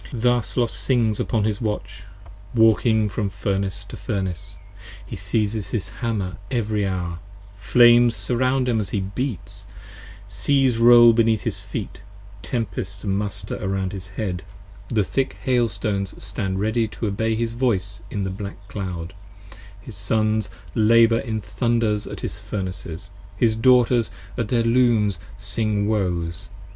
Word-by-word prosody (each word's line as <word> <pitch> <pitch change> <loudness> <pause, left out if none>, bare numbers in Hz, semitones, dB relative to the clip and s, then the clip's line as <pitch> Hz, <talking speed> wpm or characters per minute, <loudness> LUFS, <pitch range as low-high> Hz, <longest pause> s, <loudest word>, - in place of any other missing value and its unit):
1 115 - -4
06 - - -6
Thus 120 -1 +1
Los 120 -2 +1
sings 115 -5 +1
upon 110 -3 0
his 105 0 -1
Watch, 100 -3 -4 0.5
walking 110 -1 +4
from 105 0 -2
Furnace 100 +1 -2
to - - -10
Furnace. 95 -6 -4 0.5
He - - -7
siezes 105 -3 -1
his 105 -3 -2
Hammer 100 -6 -2
every 110 -4 0
hour: 90 -3 -3 0.4
flames 120 +3 +5
surround 130 +1 0
him 115 -3 +2
as 100 -3 -3
35 - - -13
He 95 -1 -2
beats; 125 - -4 0.6
seas 130 +2 +2
roll 120 0 +8
beneath 110 -2 +2
his 110 -5 -2
feet, 100 +1 -6 0.4
tempests 100 -4 -4
muster 100 0 -2
Around 95 -1 -1
his 95 -2 -7
head, 95 -2 -4 0.5
the 110 -3 +2
thick 135 +7 -1
hail 125 -3 +2
stones 100 -5 -2
stand 95 -1 -3
ready 110 +2 +1
to 110 - -5
obey 110 +2 0
His 115 0 -1
voice 105 -5 -1
in 100 - -3
the 95 - -2
black 100 +1 -8
cloud, 90 -3 -5 0.7
his 105 +1 -10
Sons 110 +1 0 0.2
labour 115 +1 +5
in 110 -1 -3
thunders 115 -3 0
At - - -7
his - - -4
Furnaces; 90 -1 -6 0.3
his 110 0 +3
Daughters 120 -1 +4 0.3
at 115 -3 -2
their 120 -1 +2
Looms 115 -4 +3 0.2
sing 105 0 -1
woes. 90 -6 -1
110 Hz, 145 wpm, -23 LUFS, 100-115 Hz, 0.7 s, roll